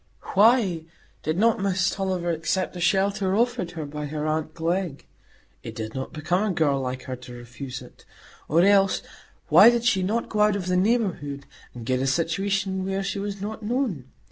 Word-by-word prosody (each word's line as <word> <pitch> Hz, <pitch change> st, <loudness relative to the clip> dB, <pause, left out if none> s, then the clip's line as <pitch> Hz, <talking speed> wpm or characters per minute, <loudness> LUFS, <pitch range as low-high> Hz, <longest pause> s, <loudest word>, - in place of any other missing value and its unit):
Why 200 Hz, -6 st, +4 dB, 0.4 s
did 155 Hz, +2 st, -2 dB
not 230 Hz, +3 st, +3 dB
Miss 190 Hz, -1 st, +1 dB
Tulliver 185 Hz, -3 st, -1 dB
accept 170 Hz, +3 st, -1 dB
the 175 Hz, -, -7 dB
shelter 195 Hz, +1 st, +1 dB
offered 230 Hz, -6 st, +1 dB
her 160 Hz, -3 st, -5 dB
by 150 Hz, +1 st, -5 dB
her 150 Hz, +1 st, -4 dB
aunt 155 Hz, 0 st, -2 dB
Glegg? 170 Hz, -2 st, -2 dB, 0.6 s
It -, -, -8 dB
did 110 Hz, 0 st, -5 dB
not 130 Hz, 0 st, -5 dB
become 175 Hz, +5 st, -1 dB
a 215 Hz, -, 0 dB
girl 145 Hz, -4 st, +2 dB
like 130 Hz, 0 st, -4 dB
her 130 Hz, -1 st, -5 dB
to 125 Hz, 0 st, -11 dB
refuse 120 Hz, +2 st, -8 dB
it. -, -, -17 dB, 0.5 s
Or 165 Hz, +3 st, +4 dB
else, 195 Hz, -1 st, +4 dB, 0.5 s
why -, -, +9 dB
did 235 Hz, -1 st, 0 dB
she 205 Hz, -6 st, +3 dB
not 215 Hz, +6 st, -1 dB
go 215 Hz, -, -3 dB
out 210 Hz, -1 st, +4 dB
of 195 Hz, -3 st, -3 dB
the 180 Hz, 0 st, 0 dB
neighbourhood, 180 Hz, -9 st, 0 dB, 0.3 s
and 120 Hz, -2 st, -8 dB
get 130 Hz, +1 st, 0 dB
a 135 Hz, -, 0 dB
situation 190 Hz, +5 st, 0 dB
where 195 Hz, +1 st, -2 dB
she 200 Hz, -, -3 dB
was 200 Hz, -1 st, -4 dB
not 220 Hz, +2 st, -5 dB
known? 220 Hz, -, -2 dB
185 Hz, 190 wpm, -25 LUFS, 150-200 Hz, 0.6 s, why